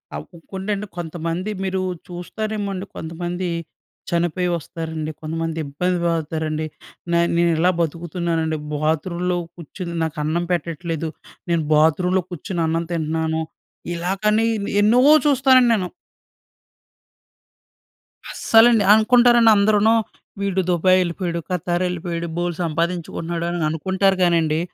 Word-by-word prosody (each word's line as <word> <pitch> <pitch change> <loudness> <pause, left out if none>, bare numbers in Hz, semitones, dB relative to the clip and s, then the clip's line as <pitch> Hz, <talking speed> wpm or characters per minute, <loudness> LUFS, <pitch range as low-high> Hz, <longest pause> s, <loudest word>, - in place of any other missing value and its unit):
అవ్ 75 - -6
ఇంకోండండి 195 +4 -4
కొంతమంది 170 +3 -3
మీరు 190 0 -1 0.3
చూస్తారేమో 205 +4 -4
అండి. 190 +1 -5
కొంతమంది 175 +3 -4 0.6
చనిపోయి 175 +1 0
వస్తారండి. 160 -1 -5
కొంతమంది 165 +1 -3
ఇబ్బంది 180 +6 -1
పడుతారండి. 155 -1 -1 0.5
న - - 0 0.2
నేను 170 0 +3
ఇలా 175 +3 +3
బతుకుతున్నానండి. 165 -1 -1 0.2
బాత్రూమ్‌లో 170 +4 -1 0.2
కూర్చుని, 170 +1 -7
నాకు 160 0 -3
అన్నం 165 +3 0
పెట్టట్లేదు. 165 -1 -2 0.4
నేను 170 -2 +1
బాత్రూమ్‌లో 180 +5 +3
కూర్చొని 175 0 -4
అన్నం 165 +1 -1
తింటున్నాను. 160 -1 -1 0.5
ఇలా 175 +2 -2
కానీ 215 +1 +3 0.4
ఎన్నో 220 +4 +4 0.3
చూస్తానండి 260 -3 +5
నేను. 185 -4 -1 2.4
అస్సలండి. 225 -1 +5
అనుకుంటారండి 240 +1 +5
అందరూనూ, 210 +2 +4 0.5
వీడు 190 -1 0
దుబాయ్ 185 +1 +4
వెళ్ళిపోయాడు. 170 -1 -2
ఖతార్ 175 0 -1
వెళ్ళిపోయాడు. 170 -1 -3
బోలెడు 175 -1 -2
సంపాదించుకుంటున్నాడు 170 0 -2
అని 175 -2 -2
అనుకుంటారు 190 +4 +1
కానండి, 165 -3 +2
175 Hz, 105 wpm, -21 LUFS, 160-190 Hz, 2.4 s, చూస్తానండి